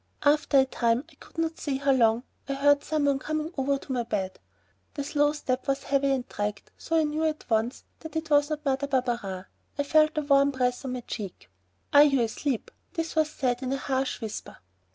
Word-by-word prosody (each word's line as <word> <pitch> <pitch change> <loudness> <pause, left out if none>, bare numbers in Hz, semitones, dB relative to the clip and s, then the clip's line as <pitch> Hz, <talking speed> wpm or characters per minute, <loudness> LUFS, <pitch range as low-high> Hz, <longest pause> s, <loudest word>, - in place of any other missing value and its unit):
After 295 0 +4
a 265 - +6
time, 235 -1 +1
I - - -20
could - - -17
not 325 0 -1
say 275 -3 -1
how 280 0 +2
long, 230 -2 +3 0.3
I 275 - 0
heard 285 +1 +4
some 305 -2 0
one 280 -1 +2
coming 310 +3 -3
over 275 0 +1
to 270 - -9
my 250 -2 +1
bed. 195 -5 -3 0.6
The 285 - -2
slow 290 +1 +2
step 260 -4 -2
was 275 0 0
heavy 275 0 +1
and 265 -2 0
dragged, 205 -1 -4
so 330 - -1
I 320 - +4
knew 305 +1 -1
at 310 -1 -1
once 225 +3 0 0.2
that 320 0 -9
it 320 -1 -3
was 290 0 +4
not 305 0 -4
Mother 275 +1 0
Barberin. 240 -8 -1 0.3
I 285 - +1
felt 310 +2 +3
a - - +3
warm 280 -1 +4
breath 250 -2 -1
on 255 - -3
my 250 - -4
cheek. 200 - -7 0.4
"Are 285 - +9
you 280 -3 +5
asleep?" 230 +2 -2 0.2
This 330 -3 -3
was 310 -1 +3
said 250 -4 -1
in 260 -1 -2
a - - 0
harsh 265 -1 -2
whisper. 220 -2 -6
275 Hz, 215 wpm, -27 LUFS, 250-300 Hz, 0.6 s, Are